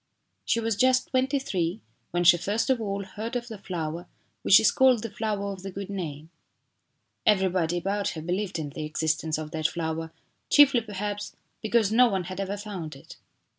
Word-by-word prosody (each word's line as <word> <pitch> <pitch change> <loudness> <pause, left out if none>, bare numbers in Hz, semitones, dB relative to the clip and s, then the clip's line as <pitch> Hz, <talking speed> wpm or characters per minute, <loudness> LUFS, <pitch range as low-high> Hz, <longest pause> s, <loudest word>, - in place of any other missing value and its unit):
She 230 - +1
was 225 -1 0
just 255 +4 +3
twenty 265 +2 +1
three 185 -7 -2 0.3
when 175 0 0
she 175 0 +8
first 205 +9 0
of 250 -3 +1
all 200 -2 -2
heard 215 +5 -6
of 240 0 -3
the 220 -3 -8
flower 170 -3 -4 0.3
which 200 - +7
is 215 - +4
called 255 -4 +4
the 230 - -5
flower 205 -2 -2
of 190 - -10
the 195 - -6
good 195 +1 -6
name. 160 -5 -6 1.0
Everybody 185 -4 +2
about 200 +3 -1
her - - -4
believed 180 +2 -2
in 150 -3 -4
the 155 - -6
existence 155 +1 -1
of 155 -1 -6
that 155 -1 0
flower, 160 -1 -4 0.4
chiefly, 280 -4 +6
perhaps 205 -1 -5 0.3
because 220 -2 +2
no 245 +3 +6
one 190 -3 -1
had 185 +2 -7
ever 195 +1 -2
found 190 -8 -6
it. 135 - -14
195 Hz, 185 wpm, -27 LUFS, 170-220 Hz, 1.0 s, she